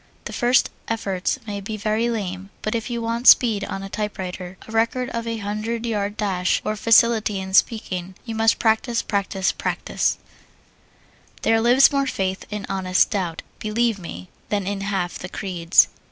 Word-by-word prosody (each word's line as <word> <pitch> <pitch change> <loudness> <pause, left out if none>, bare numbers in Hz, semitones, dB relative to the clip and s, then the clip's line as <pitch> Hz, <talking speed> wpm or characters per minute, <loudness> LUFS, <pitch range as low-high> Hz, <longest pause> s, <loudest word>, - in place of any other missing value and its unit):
The - - -6
first 245 +1 +3 0.2
efforts 195 -2 -1
may 205 -2 -4
be 215 +2 -5
very 220 +2 0
lame, 195 -4 -4
but 215 - -1
if 230 0 -2
you 235 -1 -3
want 230 +2 -1
speed 220 -5 +7
on 195 - -5
a - - -5
typewriter, 190 -3 -5
a - - -10
record 230 +3 0
for 230 0 -3
a 230 - -2
hundred 220 +3 -3
yard 205 -2 -2
dash, 190 -4 +1
or 215 - -1
facility 220 -1 +4
in 190 0 -6
speaking, 190 -4 +1
you 230 - -5
must 225 0 +3
practise, 230 +1 +1
practise, 195 -2 0
PRACTISE. - - -1 1.3
There 225 0 +3
lives 245 +4 +6
more 275 -1 +1
faith 190 -5 -2
in 210 -1 -4
honest 185 -1 +1
doubt, 175 -5 -2 0.2
Believe 220 0 0
me, 90 - -8 0.2
than 200 -2 -1
in 200 0 -3
half 195 -3 -2
the 180 - -7
creeds. 180 -4 +3
210 Hz, 170 wpm, -22 LUFS, 190-230 Hz, 1.3 s, speed